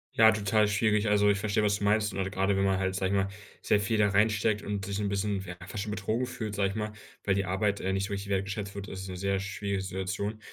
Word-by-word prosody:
Ja, 110 0 +8
total 105 0 +2
schwierig. 105 +1 +2
Also, 105 0 +4
ich 100 -1 +2
verstehe, 105 +1 +1
was 105 0 +2
du 100 - -1
meinst. 105 0 +2
Und 95 0 -2
gerade 95 +1 +1
wenn 95 - +2
man 95 -1 +2
halt, 95 0 0
sage 95 0 0
ich 100 - +2
mal, 95 0 +1 0.3
sehr 105 - +3
viel 110 +2 0
da 105 -1 +4
reinsteckt 105 +1 +2
und 100 -1 -3
sich 100 +1 -3
'n 105 -1 0
bisschen, 100 0 -1
ja, 90 -2 -7
fast 100 +1 -5
schon 110 - -4
betrogen 110 +5 -1
fühlt, 110 -4 -5
sage 100 -1 +1
ich 100 - -6
mal, 105 -1 -2 0.3
weil 100 - +2
die 100 0 0
Arbeit, 100 +2 0
äh, 95 - -1
nicht 95 0 0
so 100 - -5
richtig 100 0 -4
wertgeschätzt 100 +1 -2
wird, 100 -1 -6
ist 95 0 -6
'ne 90 - -5
sehr 100 +1 0
schwierige 100 0 -3
Situation. 95 +3 -3
100 Hz, 270 wpm, -29 LUFS, 95-105 Hz, 0.3 s, Ja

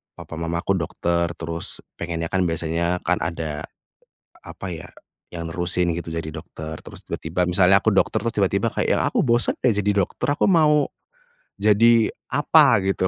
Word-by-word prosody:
papa - - -9
mamaku 85 +3 -1
dokter, 85 0 -1
terus 85 0 -6 0.2
pengennya 85 -1 -4
kan 95 +1 0
biasanya 85 +1 -1
kan 90 -3 +1
ada, 80 -3 -4 0.8
apa 95 - -7
ya, 85 +1 -7 0.5
yang 85 -1 -5
nerusin 85 +1 0
gitu 85 -1 -6
jadi 80 -1 -4
dokter. 80 0 -8
Terus - - -12
tiba-tiba 85 +3 -2
misalnya 95 +2 +4
aku 110 - +3
dokter, 100 +1 +1
terus 115 0 -2
tiba-tiba 100 +3 +1
kayak - - -2
yang, - - 0
"Aku - - +1
bosan 120 0 +3
deh 120 -5 +2
jadi 105 0 0 0.2
dokter, - - -3
aku 145 - +1
mau 150 -5 +4 0.7
jadi 110 +2 +4 0.2
apa 100 - +4
gitu," 95 -1 0
90 Hz, 160 wpm, -22 LUFS, 85-105 Hz, 0.8 s, misalnya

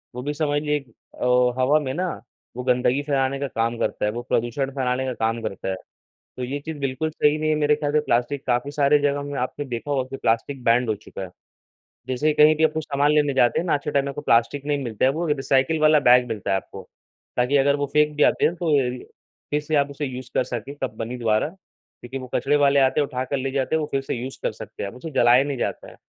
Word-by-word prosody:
वो 125 - -4
भी 145 +2 -2
समझ 145 -1 0
लिए 150 0 0
क - - -25 0.3
अ, 125 0 +2
हवा 145 +4 +4
में 135 -3 -3
ना 180 +4 -1 0.5
वो 125 - -3
गंदगी 125 +1 +2
फैलाने 140 -2 0
का 140 - -2
काम 115 -1 -1
करता - - -1
है, 105 - +1
वो 120 +2 -5
प्रदूषण 120 +4 0
फैलाने 130 -1 0
का 130 - -2
काम 115 0 -1
करता 100 -3 -4
है। 95 - -1 0.6
तो 125 - -4
ये 135 +3 -3
चीज़ 160 +2 -7
बिल्कुल 135 +3 -2
सही 150 -1 +2
नहीं 155 0 -1
है 155 - +3
मेरे 150 0 +3
ख़याल 145 -1 -2
से 150 - +4
प्लास्टिक 125 +4 0
काफ़ी 125 +3 0
सारे 145 0 +3
जगहों 145 0 0
में 145 0 -5
आपने 130 +3 -3
देखा 125 +2 -5
होगा 135 -2 +1
कि 135 - -6
प्लास्टिक 125 +3 -1
बैन्ड 115 +1 +3
हो 110 - +1
चुका 105 - -10
है। 95 - -6 0.8
जैसे 130 +4 +1
कहीं 150 +1 +6
भी 160 +1 +3
कुछ 160 - -2
सामान 145 0 +1
लेने 150 -2 +2
जाते 120 -3 +3
हैं 170 - -2
ना, 175 - +1
आज 145 - +2
के - - -3
टाइम 140 -1 +1
में 140 - -4
कोई 145 - -7
प्लास्टिक 115 +5 +2
नहीं 145 -1 -1
मिलता 115 -1 -1
है 130 - +4
वो 165 +5 -2
रिसाइकिल 135 +1 +1
वाला 155 0 +5
बैग 125 -1 +5
मिलता 110 -3 -4
है - - +3
आपको। - - -8 0.6
ताकि 125 +3 +3
अगर 140 +1 +3
वो 145 0 -1
फेंक 150 0 +3
भी 150 - +3
आते - - +3
हैं 170 - +1
तो 175 -1 -4 0.8
फिर 150 0 +1
से 155 +1 -2
आप 140 -1 +2
उसे 145 +1 -4
यूज़ 130 -2 -7
कर - - +2
सके, 125 +2 -6
कंपनी 125 -3 -5
द्वारा। 110 0 +1
क्योंकि 160 -7 -12
वो 130 -1 -7
कचरे 135 +4 +2
वाले 140 -1 +4
आते 135 +2 +3
हैं 145 - 0
उठाकर 130 +2 -3
ले 135 0 -2
जाते 135 +3 0
हैं - - +2
वो 150 - -3
फिर 135 - 0
से 135 - -4
यूज़ 125 +2 -6
कर - - 0
सकते - - -8
हैं। 100 - -3
उसे 125 +7 -8
जलाया 120 -1 +5
नहीं 140 -1 -3
जाता - - -3
है - - -15
135 Hz, 255 wpm, -23 LUFS, 125-145 Hz, 0.8 s, कहीं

